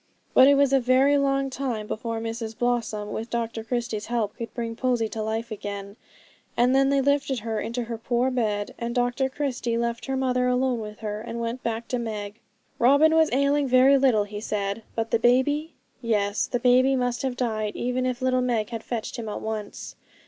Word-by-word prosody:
But 260 - +8
it 280 - +6
was 280 -1 +3
a 270 - +5
very 260 +3 +4
long 275 -1 +1
time 250 -5 -3
before 225 +1 -4
Mrs 225 -1 -5
Blossom, 230 -4 -1
with 225 +2 -4
Dr 230 -1 -3
Christie's 230 -2 -3
help, 225 -4 -1
could 230 -2 -6
bring 230 -2 -3
Posy 245 -2 0
to 220 - -4
life 225 +2 -3
again; 200 -1 -6 0.6
and 245 +2 +4
then 270 0 +4
they 275 0 +3
lifted 280 -2 +1
her 220 -1 -2
into 235 +2 -3
her 230 -1 -6
poor 240 +2 0
bed, 210 -5 -1
and 235 +1 -3
Dr 245 +2 +1
Christie 260 -4 -2
left 235 +1 -2
her 270 0 -1
mother 250 -1 +1
alone 250 -1 +1
with 210 0 -8
her, 210 -1 -4
and 230 +1 -6
went 235 +2 -3
back 230 0 -3
to 250 - -1
Meg. 215 -2 -5 0.4
Robin 285 +6 +5
was 320 -1 +4
ailing 280 +2 +2
very 255 +2 +6
little, 260 -6 +3
he 205 0 -7
said: 200 0 -2
but 225 0 -2
the 230 - +3
baby? 290 +7 +2 0.3
Yes, 210 -3 0
the 245 - -1
baby 255 +2 +4
must 245 -1 -1
have 260 -2 -2
died 215 -4 -2
even 250 +1 -1
if 255 0 -3
little 255 -1 +2
Meg 235 -3 -1
had 225 -1 -5
fetched 235 +1 -4
him 225 -2 -5
at - - -4
once. 215 -2 -5
240 Hz, 200 wpm, -25 LUFS, 225-260 Hz, 0.6 s, But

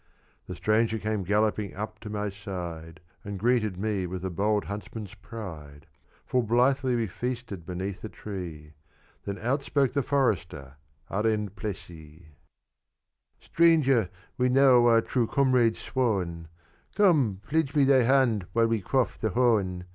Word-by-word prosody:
The - - -6
stranger 110 +1 +1
came 110 -1 -2
galloping 105 +1 0
up 105 +3 -6
to 105 - -8
my 105 0 -2
side, 90 -5 -7 0.2
And 100 0 -5
greeted 110 -3 +1
me 100 -2 -1
with 90 +1 -5
a 95 - -2
bold 105 +3 0
huntsman's 105 0 -7
pride: 85 -10 -9 0.4
Full 125 - +1
blithely 125 +3 +2
we 115 -1 0
feasted 115 -4 -5
beneath 95 +1 -5
a 110 - -5
tree; 85 -9 -8 0.5
Then 100 0 -4
out 125 +8 -1
spoke 140 -2 0
the 140 - +1
Forester, 105 - -1 0.3
Arend 105 -1 0
Plessie. 85 -5 -8 1.1
"Stranger, 140 - +3 0.3
we 125 0 +3
now 125 -2 +5
are 115 -1 +5
true 120 0 0
comrades 125 -4 +2
sworn; 95 -10 -2 0.5
Come 145 - +3
pledge 155 0 0
me 145 - +5
thy 135 -1 +5
hand 120 -6 +2
while 115 0 +3
we 115 -2 0
quaff 130 +6 0
the 110 - 0
horn. 105 -6 +1
110 Hz, 140 wpm, -27 LUFS, 95-125 Hz, 1.1 s, now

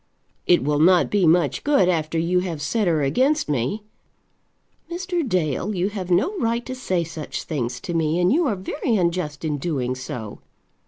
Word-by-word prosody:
"It 175 - +4
will 145 +1 +1
not 175 +2 +4
be 200 -4 +3
much 165 -2 +2
good 280 -11 +3
after 165 -2 0
you 170 +3 +2
have 175 -4 -4
set 205 +7 0
her 160 -4 +2
against 265 - +2
me." 145 - -1 1.1
"Mr. 355 0 -2
Dale, 180 +3 0
you 185 +2 0
have 195 -4 -6
no 205 - +2
right 235 -1 0
to 260 - -5
say 185 -9 -1
such 160 -2 -6
things 125 -5 -3
to 175 - -5
me, 165 0 +1
and 180 +5 +3
you 330 +1 +2
are 215 - 0
very 225 +6 -2
unjust 170 -5 -1
in 150 -2 -1
doing 135 -5 -1
so. 125 -4 -7
175 Hz, 180 wpm, -23 LUFS, 150-210 Hz, 1.1 s, It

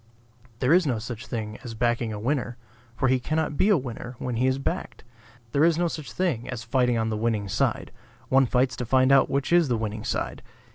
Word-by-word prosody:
There 130 +4 +4
is 180 -2 +4
no 125 -4 +1
such 115 +1 -7
thing 110 -3 -5
as 115 -2 -7
backing 120 0 0
a 105 - -4
winner; 125 0 -1 0.4
for 130 - +1
he 130 0 +3
cannot 155 +3 -1
be 190 - +3
a 205 - +5
winner 125 -2 -6
when 125 -2 -3
he 130 +2 +2
is 130 0 +1
backed. 145 +6 -4 0.5
There 140 +4 +3
is 165 -1 +4
no 175 0 +2
such 155 -7 -6
thing 140 -8 -1
as 120 -3 -5
fighting 125 0 +1
on 110 0 0
the - - -1
winning 110 -2 -1
side; 95 - -1 0.4
one 135 0 +4
fights 130 +1 +1
to 125 - -3
find 130 +2 +4
out 135 -1 +5
which 140 +4 0
is 175 -3 +5
the 120 -3 +1
winning 110 -1 -4
side. - - -3
125 Hz, 225 wpm, -26 LUFS, 115-140 Hz, 0.5 s, a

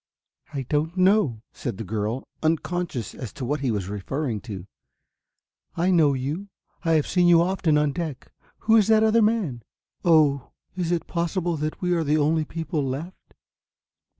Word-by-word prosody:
"I 140 -3 -3
don't 155 +7 -1
know," 185 - +3
said 120 -6 -5
the 115 - -4
girl, 110 +4 -3
unconscious 160 - -1
as 125 -6 -7
to 135 - -5
what 145 +4 -1
he 135 -2 -1
was 100 -5 -1
referring 105 +4 -3
to. 100 -7 -7 1.1
"I 175 +3 +2
know 155 -6 +4
you, 150 +10 -4 0.3
I 165 -2 +2
have 155 -2 +3
seen 180 -1 +2
you 170 -1 +6
often 175 -4 +1
on 150 -1 +2
deck 155 -4 -5 0.3
who 225 +1 +5
is 210 - +4
the 220 0 +5
other 225 +1 +4
man? 210 - +1 0.4
Oh, 150 -5 +3 0.2
is 175 -2 -1
it 170 -2 0
possible 175 0 -1
that 155 +4 -4
we 180 0 +2
are 165 -2 +1
the 150 +1 +2
only 155 +1 +2
people 160 -1 -3
left?" 140 +8 -6
155 Hz, 170 wpm, -25 LUFS, 135-175 Hz, 1.1 s, you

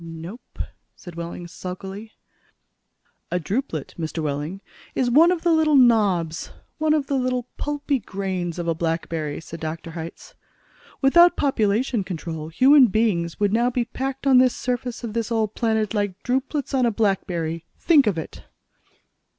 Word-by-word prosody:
"Nope," 165 +7 -10 0.4
said 175 - -11
Wehling 170 +1 -6
sulkily. 190 +5 -8 1.2
"A 180 - 0
drupelet, 180 - -3
Mr. 160 0 -3
Wehling, 150 +6 -3 0.3
is 245 -2 +1
one 320 +7 +7
of 350 -2 -1
the 345 - +3
little 315 -2 +4
knobs, 205 - +3 0.3
one 310 0 +3
of 295 -3 0
the 280 - -3
little 250 -2 0
pulpy 290 -2 -1
grains 190 -4 -4
of 170 -1 -3
a 165 - +2
blackberry," 160 -2 -2
said 165 0 -9
Dr. 160 +1 -5
Hitz. 165 0 -8 0.7
"Without 345 +6 +6
population 230 -3 +1
control, 165 -3 -5
human 260 - +6
beings 185 -6 0
would 205 -1 +2
now 240 +2 +3
be 245 -1 -1
packed 265 +3 -4
on 265 -2 +6
this 255 -1 +4
surface 245 -1 -3
of 225 -3 -4
this 230 0 -2
old 220 -2 0
planet 220 -2 0
like 205 -3 -2
drupelets 265 +3 -1
on 255 -2 +3
a - - +2
blackberry! 175 -6 -1
Think 295 -8 +4
of 195 -5 +1
it!" 160 - -7
210 Hz, 155 wpm, -23 LUFS, 170-255 Hz, 1.2 s, one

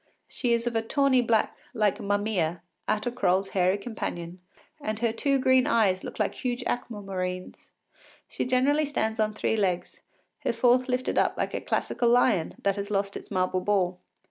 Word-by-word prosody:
She 245 -2 -1
is 235 0 0
of 240 -1 -2
a 225 - +2
tawny 265 +2 +3
black, 230 -2 +1 0.2
like 210 -4 +2
Mummia, 200 -5 0 0.3
Atta 215 +3 0
Croll’s 195 -4 +1
hairy 185 0 +2
companion, 180 -5 -5 0.4
and 215 -4 -2
her 230 0 0
two 275 +4 +1
green 260 0 +4
eyes 205 -9 +2
look - - -7
like 210 - 0
huge 250 -1 -3
aqua 225 -4 -3
marines. 185 -1 -5 0.6
She - - -3
generally 270 +4 +2
stands 220 -6 -1
on 215 -1 +1
three 220 - 0
legs, 185 -4 -1 0.4
her - - -1
fourth 250 +2 +3
lifted 250 0 0
up - - +1
like - - -2
a - - -2
classical 240 - 0
lion 235 -9 +3
that 200 0 +1
has 200 +1 -4
lost 200 -1 -1
its - - -8
marble 185 -1 0
ball. 185 -2 +1
215 Hz, 175 wpm, -27 LUFS, 195-245 Hz, 0.6 s, green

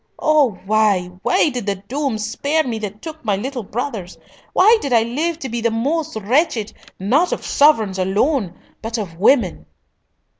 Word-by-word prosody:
Oh, 300 -9 +2
why, 205 -4 +2
why - - +2
did 245 -6 -5
the 200 - +1
doom 245 +6 -3
spare 280 +9 -1
me 230 -5 -3
that 210 -1 -7
took 315 -1 -8
my 210 -3 +1
little 250 +5 -4
brothers? 210 -5 -5 0.4
Why 440 +4 +5
did 280 - -3
I 230 -2 +4
live 305 +8 -2
to 275 - -6
be 235 0 -3
the 230 - +2
most 290 +7 -1
wretched, 225 - 0 0.2
not 265 - +1
of - - -3
sovereigns 220 -10 +3
alone, 195 - 0 0.3
but 225 +1 -3
of 175 -6 -6
women?" 215 -3 +2
230 Hz, 165 wpm, -19 LUFS, 205-290 Hz, 0.4 s, Why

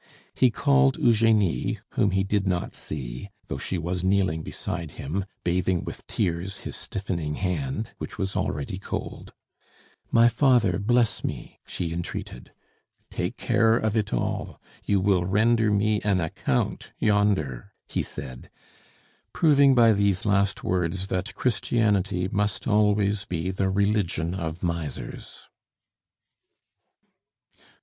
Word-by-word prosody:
He 130 - +4
called 65 - +3
Eugenie, 110 -5 +2
whom 100 - +1
he 95 0 +1
did 100 0 0
not 90 -2 -1
see, 65 +4 -7 0.2
though 70 - -5
she 90 - -2
was 90 +2 -3
kneeling 95 -4 +2
beside 85 +1 -5
him 90 +8 -3 0.2
bathing 90 0 +1
with - - -8
tears 90 +3 -2
his - - -5
stiffening 85 -6 -3
hand, 110 +5 -2
which - - -7
was 95 0 -2
already 70 -1 -2
cold. - - -6 0.8
"My 115 0 +6
father, 120 - +3
bless 120 +2 +1
me!" - - -5
she 85 -2 -3
entreated. 85 -7 -6 0.6
"Take - - -3
care 115 0 +3
of 110 -1 -1
it 105 -2 0
all. - - -2 0.2
You 100 -1 +2
will 95 -2 +2
render 110 +3 +3
me 105 +1 +2
an 100 -3 +1
account 80 -6 -2
yonder!" 100 - +1 0.2
he - - -1
said, 65 -4 -8 0.8
proving 140 -4 +5
by 115 -2 +6
these 100 -2 +1
last 100 -1 +1
words 90 +1 -1
that 95 0 -3
Christianity 105 -6 +1
must 100 -1 -1
always 105 -1 +2
be 90 +1 -2
the 95 0 0
religion 95 -4 0
of 85 -2 -4
misers. 85 -5 -4
95 Hz, 125 wpm, -26 LUFS, 85-105 Hz, 0.8 s, My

